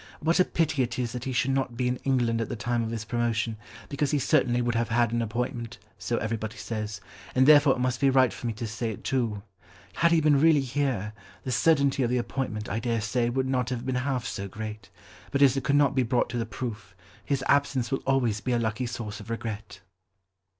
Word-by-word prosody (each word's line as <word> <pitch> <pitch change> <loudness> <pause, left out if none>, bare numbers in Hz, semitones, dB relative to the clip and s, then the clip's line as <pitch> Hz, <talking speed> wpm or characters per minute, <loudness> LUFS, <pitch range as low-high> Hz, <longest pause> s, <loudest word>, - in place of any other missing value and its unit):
What 165 +4 +1
a 185 - +6
pity 155 -4 0
it 120 -2 -1
is 120 -2 -1
that 125 0 -5
he 130 - -2
should 125 +1 +1
not 135 -3 -1
be 125 0 0
in 125 0 0
England 120 -4 +1
at 115 - -3
the - - -3
time 120 +2 -1
of 115 - -2
his 115 -1 -4
promotion, 115 -1 -1 0.3
because 140 0 -1
he 150 - +1
certainly 125 -2 +2
would 120 -1 0
have 115 0 0
had 120 0 +2
an 120 0 0
appointment, 120 +1 -3 0.2
so 120 - -1
everybody 110 0 -3
says, 105 -3 -5 0.3
and 130 0 +5
therefore 145 -2 +7
it - - -6
must 125 0 -1
be 140 - +5
right 130 -1 +4
for 120 - -5
me 115 - -1
to 115 +2 -5
say 115 +1 -3
it 105 - -7
too. 115 -7 -1 0.5
Had 170 0 +4
he 165 - +5
been 150 -2 +4
really 160 -2 +5
here, 130 -6 -1 0.3
the 130 - -3
certainty 140 +1 +3
of 120 - +1
the 125 - +1
appointment, 120 -4 -3
I 105 +4 -2
dare 115 0 -1
say, 120 +3 0
would 130 +2 -1
not 125 -2 0
have 125 -1 -4
been 130 - -1
half 130 -3 -2
so 100 - -4
great, 105 0 -7 0.4
but 140 0 +2
as 135 -2 +5
it 135 - -2
could 140 0 +2
not 145 -1 +4
be 130 - +2
brought 125 0 +1
to 120 - -2
the 115 - -2
proof, 105 -7 -6 0.3
his 140 -2 -1
absence 140 -3 +2
will 135 - 0
always 120 -6 +1
be 125 - -1
a - - +3
lucky 115 +2 -1
source 115 -4 -5
of 105 - -11
regret." 110 -3 -5
120 Hz, 235 wpm, -27 LUFS, 115-135 Hz, 0.5 s, therefore